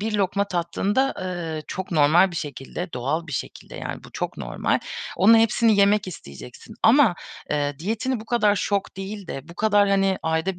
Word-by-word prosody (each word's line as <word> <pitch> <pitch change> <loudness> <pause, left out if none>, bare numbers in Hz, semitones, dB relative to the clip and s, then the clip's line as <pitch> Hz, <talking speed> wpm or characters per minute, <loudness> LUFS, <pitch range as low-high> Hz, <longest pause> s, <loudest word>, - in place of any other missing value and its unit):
bir 215 +1 -2
lokma 200 0 +1
tattığında, 195 +9 0
ııı, 170 -4 -4
çok 190 0 -5
normal 165 +3 +4
bir 170 - -7
şekilde, 150 +3 -6
doğal 140 +7 -2
bir 155 - -8
şekilde 125 - -6
yani - - -6
bu - - -14
çok - - -4
normal, - - -1 0.4
onun 220 +5 +6
hepsini 225 -1 +3
yemek 200 +1 +4
isteyeceksin. 125 - -11
Ama, 235 -4 +6 0.4
eee, 145 -1 -1
diyetini 225 +7 -2
bu 220 - -10
kadar 215 -3 +2
şok 200 0 -2
değil 195 0 -6
de 140 +2 -7
bu 170 - -11
kadar, 205 0 +3
hani, 195 -1 +2
ayda 160 +3 -1
190 Hz, 175 wpm, -23 LUFS, 160-210 Hz, 0.4 s, onun